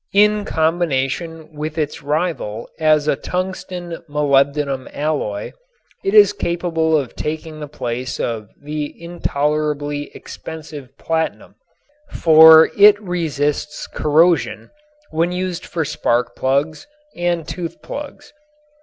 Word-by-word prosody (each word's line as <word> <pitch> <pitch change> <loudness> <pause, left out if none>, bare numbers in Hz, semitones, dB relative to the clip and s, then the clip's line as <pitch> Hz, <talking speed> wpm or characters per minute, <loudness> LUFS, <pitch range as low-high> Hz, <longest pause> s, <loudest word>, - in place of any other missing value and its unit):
In 210 0 +4
combination 160 -1 -1
with 155 +1 -5
its 150 -2 -2
rival 145 -7 -2
as 155 -1 +3
a 150 - +3
tungsten 180 0 -5
molybdenum 140 -1 +1
alloy 145 -9 -2 0.5
it 390 +2 0
is 420 0 +7
capable 165 - 0
of 135 -5 -4
taking 155 0 -5
the 150 - -6
place 125 -2 -4
of 110 -4 -3
the 150 0 -5
intolerably 150 -3 -2
expensive 150 -4 -9
platinum, 160 0 -2 0.6
for 160 0 +7
it 205 0 +7
resists 150 -6 -2
corrosion 165 +3 +1 0.4
when 165 +2 +1
used 180 -1 -3
for 165 -2 -2
spark 120 -3 0
plugs 140 - -1 0.3
and 175 -2 -1
tooth 170 -2 -5
plugs. 290 0 -8
155 Hz, 110 wpm, -19 LUFS, 145-175 Hz, 0.6 s, is